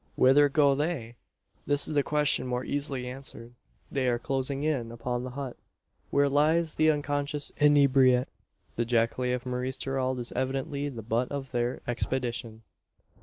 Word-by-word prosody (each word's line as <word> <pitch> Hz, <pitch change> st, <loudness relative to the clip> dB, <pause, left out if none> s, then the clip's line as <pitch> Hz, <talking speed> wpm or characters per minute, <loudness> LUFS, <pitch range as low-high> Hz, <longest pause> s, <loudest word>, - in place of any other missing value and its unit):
Whither 145 Hz, +3 st, +5 dB
go 140 Hz, -1 st, +4 dB
they? 140 Hz, -5 st, -2 dB, 0.5 s
This 145 Hz, 0 st, +4 dB
is 155 Hz, -, -3 dB
a 145 Hz, -, +4 dB
question 150 Hz, -3 st, +1 dB
more 125 Hz, 0 st, -2 dB
easily 140 Hz, -3 st, -2 dB
answered. 125 Hz, -2 st, -7 dB, 0.4 s
They 135 Hz, -2 st, 0 dB
are 120 Hz, -1 st, +2 dB
closing 135 Hz, +3 st, -2 dB
in 135 Hz, -7 st, -1 dB
upon 120 Hz, +1 st, -3 dB
the 130 Hz, -, -5 dB
hut, 130 Hz, -1 st, -6 dB, 0.5 s
where 140 Hz, 0 st, +3 dB
lies 155 Hz, +3 st, +2 dB
the 155 Hz, 0 st, +3 dB
unconscious 145 Hz, -1 st, 0 dB
inebriate. 135 Hz, -4 st, +5 dB, 0.5 s
The 120 Hz, -, +2 dB
jacale 120 Hz, +2 st, +1 dB
of 125 Hz, -, -7 dB
Maurice 125 Hz, +1 st, -3 dB
Gerald 130 Hz, -1 st, -1 dB
is 120 Hz, -1 st, -4 dB
evidently 135 Hz, +2 st, -2 dB
the 115 Hz, -5 st, -8 dB
butt 115 Hz, +3 st, -1 dB
of 140 Hz, -2 st, -5 dB
their 120 Hz, 0 st, -1 dB
expedition. 120 Hz, -2 st, -3 dB
130 Hz, 155 wpm, -28 LUFS, 125-145 Hz, 0.5 s, Whither